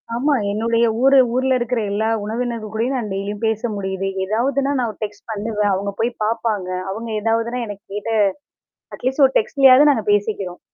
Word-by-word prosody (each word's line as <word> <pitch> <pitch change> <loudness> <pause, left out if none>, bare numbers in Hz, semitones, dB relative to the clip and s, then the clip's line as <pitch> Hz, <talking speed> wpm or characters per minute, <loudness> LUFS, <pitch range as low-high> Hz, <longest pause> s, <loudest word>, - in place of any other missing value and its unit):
ஆமா. 285 +5 +1 0.2
என்னுடைய 230 +2 +1 0.2
ஊரு 270 0 +6 0.2
ஊர்ல 260 0 +2
இருக்கிற 240 0 -1
எல்லா 220 +2 0
உறவினர்கள் 230 0 -4
கூடயும் 235 +5 -1
நான் 225 -4 -3
டெய்லியும் 200 +1 -4
பேச 220 -1 0
முடியுது. 190 -1 -3 0.2
எதாவதுன்னா 270 +7 0
நான் 240 -2 0
ஒரு 210 - -21
டெக்ஸ்ட் 210 -1 -7
பண்ணுவேன். 210 -1 -1
அவங்க 200 +1 -2
போய் 235 - +1
பாப்பாங்க. 220 -4 -1 0.2
அவங்க 225 +3 -6
ஏதாவதுனா 230 +2 0
எனக்கு 205 -1 -9
கேட்ட 210 +2 -4 0.8
அட்லீஸ்ட் 265 +3 0
ஒரு 265 - -12
டெக்ஸ்ட்லயாது 270 +4 +5
நாங்க 225 -6 0
பேசிக்கறோம். 205 -3 -1
225 Hz, 160 wpm, -20 LUFS, 205-250 Hz, 0.8 s, ஊரு